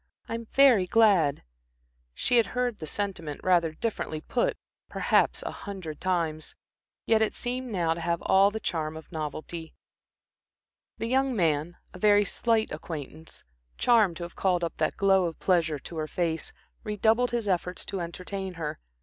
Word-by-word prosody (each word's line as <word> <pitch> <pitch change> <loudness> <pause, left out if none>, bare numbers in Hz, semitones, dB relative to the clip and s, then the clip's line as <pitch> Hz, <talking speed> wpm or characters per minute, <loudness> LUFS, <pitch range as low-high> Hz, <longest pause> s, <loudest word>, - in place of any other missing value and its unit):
"I'm 230 0 -5
very 250 -10 +5
glad." 185 -10 +4 0.7
She 245 - +2
had 230 - +4
heard 245 -3 0
the 155 - -6
sentiment, 170 -6 -3
rather 170 -3 +3
differently 160 -5 -3
put, 235 +9 -1 0.3
perhaps - - +2
a - - -4
hundred 185 -7 -7
times. 165 -4 -1 0.5
Yet 220 -1 +3
it 220 - +1
seemed 250 0 -3
now 170 -5 +1
to 170 - -7
have 170 0 0
all 195 +1 +5
the 220 +2 -5
charm 160 -6 -3
of 160 - -12
novelty. 160 +1 -6 1.2
The 225 - -3
young 260 +2 +1
man, 165 -2 0 0.2
a 185 - -10
very 205 +1 +5
slight 225 +2 +1
acquaintance, 155 0 -7 0.3
charmed 215 -8 +4
to 175 - -6
have 170 - -8
called 180 -2 +1
up 165 - -2
that 155 - 0
glow 195 -2 +4
of 165 -2 -4
pleasure 165 -5 +2
to 160 +4 -9
her 155 -1 -2
face, 165 -1 -2 0.3
redoubled 220 +3 +2
his 235 -3 -2
efforts 180 -1 -1
to 195 - -4
entertain 185 +2 -5
her. 160 - -4
180 Hz, 160 wpm, -27 LUFS, 160-220 Hz, 1.2 s, very